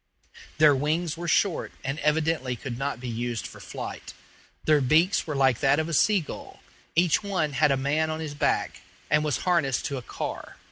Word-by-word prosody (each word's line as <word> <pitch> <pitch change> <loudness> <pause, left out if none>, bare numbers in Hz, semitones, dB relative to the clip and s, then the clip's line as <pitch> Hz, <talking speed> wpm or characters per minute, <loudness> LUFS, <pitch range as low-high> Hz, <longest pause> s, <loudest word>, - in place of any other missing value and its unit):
Their 150 -2 +6
wings 155 +4 -1
were 170 +1 -6
short, 180 +1 +1
and 135 +3 -3
evidently 150 -4 0
could 120 +1 -6
not 135 -1 -3
be 125 - -6
used 120 -1 -3
for - - -9
flight; - - -7 0.5
their 155 -2 +4
beaks 160 +9 +3
were 150 - -3
like 135 -3 +3
that 140 +1 +3
of 160 0 0
a 165 - -4
sea 200 +6 +4
gull; 155 - -10 0.3
each 170 -1 +3
one 185 -8 -1
had 150 +2 +3
a 135 - +2
man 150 +4 0
on 155 0 -3
his 155 -2 -5
back, 145 - -1 0.3
and 150 0 +4
was 150 -4 0
harnessed 165 -8 +1
to 140 - -2
a - - -5
car. - - -6
150 Hz, 195 wpm, -26 LUFS, 135-160 Hz, 0.5 s, Their